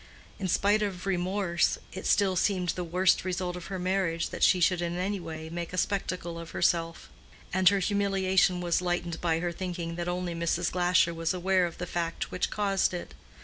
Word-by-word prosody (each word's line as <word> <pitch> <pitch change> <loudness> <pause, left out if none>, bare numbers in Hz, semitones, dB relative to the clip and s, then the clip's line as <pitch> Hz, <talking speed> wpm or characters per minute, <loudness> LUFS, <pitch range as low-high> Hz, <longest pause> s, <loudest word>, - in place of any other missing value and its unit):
In 190 - -2
spite 205 +4 +3
of 195 -3 -3
remorse, 185 -1 +1 0.2
it 190 - -5
still 195 -2 +3
seemed 180 -1 +1
the 180 - -1
worst 180 +2 +2
result 180 -1 -2
of 180 -1 -7
her 190 - -4
marriage 180 -2 0
that - - -6
she 185 - +5
should 175 0 +3
in 175 0 -2
any 195 +2 -1
way 160 -2 -7
make 170 +1 -5
a - - -4
spectacle 180 -3 -2
of 165 0 -8
herself; 165 -1 0 0.5
and 185 0 +6
her 200 - +2
humiliation 190 -2 +2
was 175 0 +1
lightened 175 -2 -2
by 165 -2 +1
her 175 -1 -1
thinking 170 -2 -4
that 175 0 -3
only 175 0 -2
Mrs. 170 +1 0
Glasher 175 -1 +3
was 165 +2 -1
aware 185 0 +2
of 170 - -10
the 175 - -4
fact 170 -1 -3
which 185 - -1
caused 195 -3 +1
it. 175 - -7
180 Hz, 195 wpm, -28 LUFS, 170-190 Hz, 0.5 s, and